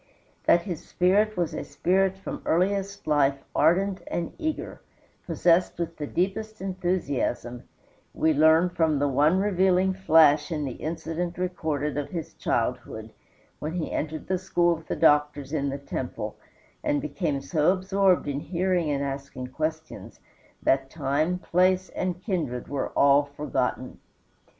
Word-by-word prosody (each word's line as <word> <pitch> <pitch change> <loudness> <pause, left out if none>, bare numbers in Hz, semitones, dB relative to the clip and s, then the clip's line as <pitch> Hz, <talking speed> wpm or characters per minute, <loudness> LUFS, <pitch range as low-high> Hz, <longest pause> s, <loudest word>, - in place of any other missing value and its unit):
That 170 - +5
his 175 -5 -7
was 185 -1 +2
a - - -4
spirit 190 +1 +1
from 195 - -6
earliest 195 +3 0
life 140 -2 +2
ardent 190 +3 +2
and 170 -1 -3
eager, 315 -1 -4 0.5
possessed 175 +1 +2
with 170 -1 -4
the 150 - -4
deepest 215 +6 -2
enthusiasm, 175 -10 -2 0.5
we 160 0 +2
learn 160 +4 +5
from 160 -4 +1
the 145 +1 +1
one 145 +6 +3
revealing 190 -1 +2
flash 160 -4 +4
in 150 -3 -2
the 135 - -3
incident 165 +4 -4
recorded 155 -5 -2
of 145 - -4
his 165 -4 -5
childhood, - - -2 0.5
when 155 +2 -4
he 175 -3 -3
entered 155 +1 -3
the 185 -1 0
school 175 -2 +2
of 160 0 -13
the - - -2
doctors 150 -2 +2
in 140 -2 0
the 140 - -3
temple 140 - -5 0.5
and 295 -1 +1
became 175 - -2
so 150 +4 +2
absorbed 190 -2 +2
in 140 -1 -2
hearing 175 +1 0
and 140 -1 0
asking 135 -2 -5
questions 155 +3 -5 0.4
that 135 0 +2
time, 155 +4 0
place, 185 +1 +2
and 185 0 -3
kindred 155 - -2
were 140 -1 -2
all 140 +1 +6
forgotten. 145 +1 -3
165 Hz, 140 wpm, -26 LUFS, 145-185 Hz, 0.5 s, all